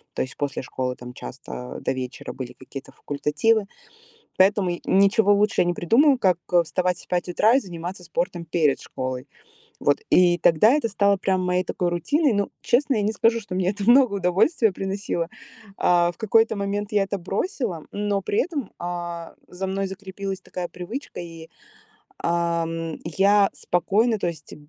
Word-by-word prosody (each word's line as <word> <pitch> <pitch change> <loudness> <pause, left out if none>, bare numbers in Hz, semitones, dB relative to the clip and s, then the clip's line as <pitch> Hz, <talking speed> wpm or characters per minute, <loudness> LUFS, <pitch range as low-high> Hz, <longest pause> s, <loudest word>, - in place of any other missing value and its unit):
то - - 0
есть 130 - -8
после 145 -1 -3
школы 125 0 -3
там 125 0 -10
часто 60 - -8
до - - -1
вечера 130 -1 -5
были 130 -2 -7
какие-то 135 +1 -10
факультативы, 150 +10 0 0.7
поэтому 190 -1 +3
ничего 200 +2 +4
лучше 210 +2 +2
я - - +1
не 175 - 0
придумываю, 265 - +4
как, 185 -6 +2
э, 175 -1 +6
вставать 180 +2 -1
в - - -21
5 180 0 -1
утра 215 +7 +4
и - - +3
заниматься 180 -2 -7
спортом 175 0 -3
перед 160 -4 +1
школой. 130 +1 -5 0.5
Вот, - - +2
и 175 -1 +5
тогда 170 +9 +5
это 290 -7 +1
стало 200 -1 +2
прям 190 -1 0
моей 180 0 +1
такой 180 0 -1
рутиной. 285 - +1
Ну, 200 -1 0
честно, 270 +2 +2
я 210 - +1
не 210 - +1
скажу, 230 +1 +2
что 200 -4 -7
мне 185 0 +1
это 205 +2 -3
много 250 -4 +6
удовольствия 200 - +2
приносило. 190 -3 -3 0.5
А 175 -1 +3
в - - -27
какой-то 225 0 +3
момент 205 +1 -3
я 205 -1 +3
это 200 +1 -3
бросила, 195 - -3
но 205 -1 -1
при 205 - 0
этом, 285 - -5
а, 175 -1 -5
за 190 +2 -5
мной 195 +1 -1
закрепилась 195 0 -6
такая 180 -1 -5
привычка, 215 +11 -7
и, 165 -1 -9 0.7
ам, 165 -1 -1
я 195 +4 +4
спокойно 215 +6 +1
То 175 - -1
есть 160 -3 -7
185 Hz, 170 wpm, -24 LUFS, 170-205 Hz, 0.7 s, э